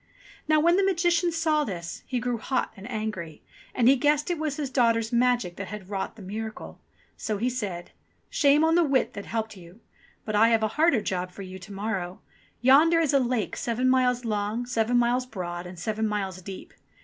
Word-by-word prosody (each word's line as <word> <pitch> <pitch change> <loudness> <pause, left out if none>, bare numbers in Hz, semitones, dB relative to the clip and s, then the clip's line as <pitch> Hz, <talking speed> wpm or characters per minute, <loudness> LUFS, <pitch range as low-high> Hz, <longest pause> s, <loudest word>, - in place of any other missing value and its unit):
Now 310 0 +4
when 340 +3 +4
the 395 - +3
Magician 345 -2 +2
saw 320 -2 +1
this, 175 -8 -6
he 255 - -1
grew 240 -1 -2
hot 260 +1 -1
and 205 +4 -10
angry, 210 -9 -5 0.3
and 240 -2 +3
he 270 - +7
guessed 295 +4 +2
it 345 - -2
was 305 -3 -2
his 285 -4 -3
daughter's 230 -3 +2
magic 240 -7 +1
that 200 - -5
had 205 0 -8
wrought 195 +2 -3
the 215 - -11
miracle. 215 +3 -7 0.4
So 215 -3 -2
he 245 +5 0
said: 195 -8 -5 0.4
"Shame 290 +2 +3
on 320 0 +3
the 345 +1 +5
wit 260 -5 +1
that 200 - -7
helped 220 -1 -3
you; 180 +2 -14 0.5
but 215 - -2
I 225 +2 +5
have 225 -1 +2
a 215 - +2
harder 300 -1 +3
job 185 -2 -2
for 195 +2 -9
you 185 0 -9
to 190 +3 -12
morrow. 195 -3 -4 0.4
Yonder 300 +7 +6
is 315 -4 +1
a 275 - +5
lake 240 -6 -1
seven 240 +2 -1
miles 250 -1 +2
long, 215 +2 -1
seven 240 0 +1
miles 245 +1 +2
broad, 175 -5 -5
and 180 0 -10
seven 215 +5 -1
miles 195 -3 -3
deep. 190 +1 -9
230 Hz, 205 wpm, -26 LUFS, 200-265 Hz, 0.5 s, he